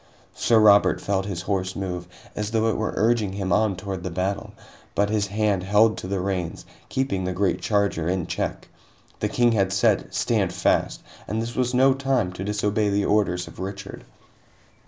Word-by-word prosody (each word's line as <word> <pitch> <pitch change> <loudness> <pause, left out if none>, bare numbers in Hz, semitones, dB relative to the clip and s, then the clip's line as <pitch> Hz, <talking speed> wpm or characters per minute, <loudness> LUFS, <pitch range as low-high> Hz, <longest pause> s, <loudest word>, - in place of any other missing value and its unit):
Sir 115 - +2
Robert 105 -1 +5
felt 95 -1 -1
his 95 -4 -4
horse 95 -2 -2
move, 90 -2 -4 0.3
as 105 0 -2
though 110 0 +1
it - - 0
were 110 - -2
urging 110 -2 +1
him 95 -2 -1
on 105 -1 +2
toward 95 0 -5
the 95 - -3
battle, 95 +3 -2 0.4
but 100 +1 +1
his 105 -2 +1
hand 105 -1 0
held 105 +4 +4
to - - -6
the 95 0 -1
reins, 90 -3 -3 0.2
keeping 130 -8 -1
the 90 0 -2
great 90 -1 0
charger 100 -6 0
in 90 -2 -1
check. - - -4 0.5
The - - -1
King 120 -1 +3
had 95 -4 +1
said 95 0 +2
"Stand 100 -6 0
fast!" 90 - 0 0.2
and 110 - -2
this 115 +2 -4
was 125 -1 0
no 135 +1 +5
time 130 -8 0
to 90 - -6
disobey 105 +1 0
the 100 0 +1
orders 95 -4 +1
of - - -12
Richard. 95 +1 -6
100 Hz, 185 wpm, -24 LUFS, 95-110 Hz, 0.5 s, Robert